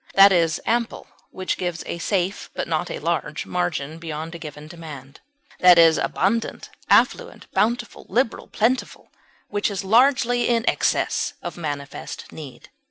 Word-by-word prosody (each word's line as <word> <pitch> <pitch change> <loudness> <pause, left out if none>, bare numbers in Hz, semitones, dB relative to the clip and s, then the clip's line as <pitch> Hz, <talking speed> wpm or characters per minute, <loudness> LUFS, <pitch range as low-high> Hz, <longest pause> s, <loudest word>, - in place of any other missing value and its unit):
That 195 0 +9
is 165 -4 +2
ample 235 0 -1 0.2
which 185 0 -3
gives 175 -2 -3
a 170 - -5
safe, 190 +1 -1
but - - -3
not - - -1
a - - -4
large, - - -2
margin 165 -4 -2
beyond 160 0 -6
a 170 - -7
given 150 -1 -9
demand; 150 -5 -10 0.4
that 180 -1 +7
is 165 -1 +6
abundant, 225 +4 -1 0.2
affluent, 485 -1 +2
bountiful, 230 +4 -1
liberal, 240 -1 0
plentiful, 245 +4 -1 0.4
which 205 +1 0
is 200 -1 -4
largely 245 +3 +3
in 230 -1 +1
excess - - +1
of - - -5
manifest 145 -4 -6
need. 145 -5 -11
180 Hz, 145 wpm, -23 LUFS, 160-230 Hz, 0.4 s, That